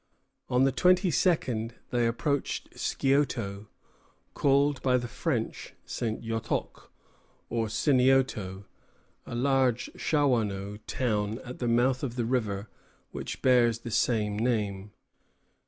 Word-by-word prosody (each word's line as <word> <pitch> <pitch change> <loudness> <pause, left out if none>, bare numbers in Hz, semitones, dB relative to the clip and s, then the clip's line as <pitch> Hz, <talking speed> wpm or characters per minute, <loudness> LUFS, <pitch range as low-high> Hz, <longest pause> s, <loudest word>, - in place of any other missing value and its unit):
On 125 +1 +3
the 135 - +4
twenty 180 +6 +3
second 120 -7 +1 0.2
they 120 -1 +2
approached 140 +5 -1
Scioto, 120 -7 0 0.7
called 140 -1 +2
by 130 -2 +3
the 120 -1 -3
French 120 -3 -3
St. 110 -2 -3
Yotoc, 115 0 -3 0.6
or 115 -1 0
Sinioto, 125 -6 +2 0.6
a - - -5
large 130 -1 +1
Shawanoe 105 -9 0
town 110 -3 -1
at 125 0 -8
the 120 - -1
mouth 125 +2 +2
of 125 -4 -3
the 120 -2 -1
river 110 -4 -1 0.4
which - - -6
bears 120 -3 +4
the 120 - -6
same 105 -3 +1
name. 105 -4 -1
120 Hz, 115 wpm, -28 LUFS, 110-135 Hz, 0.7 s, the